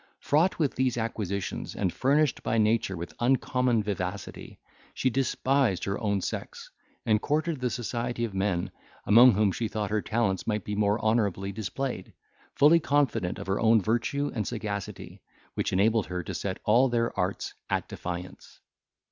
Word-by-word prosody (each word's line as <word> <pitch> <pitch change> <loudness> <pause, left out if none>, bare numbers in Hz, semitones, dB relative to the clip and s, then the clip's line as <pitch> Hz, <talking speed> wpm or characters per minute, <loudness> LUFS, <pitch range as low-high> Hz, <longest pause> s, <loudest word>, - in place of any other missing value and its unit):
Fraught 160 +6 +2
with 150 -5 +1
these 130 -2 0
acquisitions, 105 -4 -3
and 95 -4 -1
furnished 145 +2 +2
by 115 - -1
nature 110 -3 +1
with 85 +1 -7
uncommon 125 -2 +2
vivacity, 100 -1 -5 0.4
she 130 - +1
despised 130 -4 +1
her 100 0 -2
own 100 -3 0
sex, - - -6 0.3
and 105 -1 +2
courted 155 0 -1
the 125 - +1
society 120 +1 -2
of 110 - -7
men, 95 -1 -1 0.3
among 120 +3 +7
whom 105 0 +2
she 115 +4 -2
thought 105 -1 -3
her 105 0 +1
talents 105 -4 -1
might 105 -3 -1
be 105 - -4
more 105 +1 +1
honourably 100 -3 0
displayed, 110 +1 -4 0.4
fully 150 +4 +6
confident 140 - 0
of - - -7
her 95 +1 -1
own 115 0 +5
virtue 120 +7 -1
and 110 -5 -2
sagacity, 105 -4 -5 0.3
which - - -1
enabled 110 +3 +2
her 90 0 -4
to - - -6
set 95 -2 -3
all 120 +5 +4
their 115 -1 0
arts 95 0 -2 0.2
at - - -1
defiance. 90 0 -7
110 Hz, 160 wpm, -27 LUFS, 100-125 Hz, 0.4 s, among